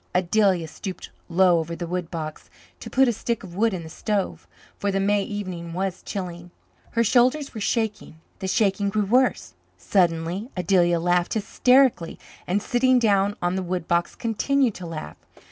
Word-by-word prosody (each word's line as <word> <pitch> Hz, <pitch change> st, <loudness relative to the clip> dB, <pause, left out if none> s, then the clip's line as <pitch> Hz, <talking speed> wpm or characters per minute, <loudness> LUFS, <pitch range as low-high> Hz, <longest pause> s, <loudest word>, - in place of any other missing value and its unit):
Adelia 185 Hz, -1 st, +2 dB
stooped 185 Hz, +4 st, -8 dB, 0.2 s
low 175 Hz, 0 st, +4 dB
over 165 Hz, +1 st, -4 dB
the 175 Hz, -, -5 dB
woodbox 165 Hz, -3 st, -5 dB, 0.3 s
to -, -, -8 dB
put 265 Hz, 0 st, +4 dB
a 240 Hz, -, +2 dB
stick 230 Hz, +1 st, -3 dB
of 180 Hz, -3 st, -10 dB
wood 225 Hz, +3 st, +2 dB
in 180 Hz, -3 st, -4 dB
the -, -, -9 dB
stove, 200 Hz, +3 st, -3 dB, 0.3 s
for 200 Hz, -, -1 dB
the 195 Hz, -, 0 dB
May 205 Hz, +1 st, +2 dB
evening 185 Hz, -5 st, -5 dB
was 185 Hz, +1 st, -3 dB
chilly. 175 Hz, -3 st, -6 dB, 0.4 s
Her 230 Hz, -, +3 dB
shoulders 255 Hz, +5 st, +2 dB
were 220 Hz, -, -6 dB
shaking; 215 Hz, -7 st, -2 dB, 0.2 s
the 190 Hz, -, -4 dB
shaking 200 Hz, 0 st, +1 dB
grew 210 Hz, 0 st, 0 dB
worse; 250 Hz, +5 st, +1 dB, 0.2 s
suddenly 175 Hz, +3 st, 0 dB
Adelia 175 Hz, -1 st, +3 dB
laughed 175 Hz, +2 st, +1 dB
hysterically 245 Hz, -4 st, +3 dB, 0.3 s
and, 200 Hz, +3 st, 0 dB
sitting 255 Hz, +1 st, +3 dB
down 205 Hz, -3 st, +2 dB
on 175 Hz, +1 st, +1 dB
the 190 Hz, -, -1 dB
woodbox, 175 Hz, -1 st, -1 dB
continued 250 Hz, +2 st, +1 dB
to 180 Hz, -2 st, -8 dB
laugh. 155 Hz, -, -7 dB
190 Hz, 160 wpm, -24 LUFS, 175-220 Hz, 0.4 s, low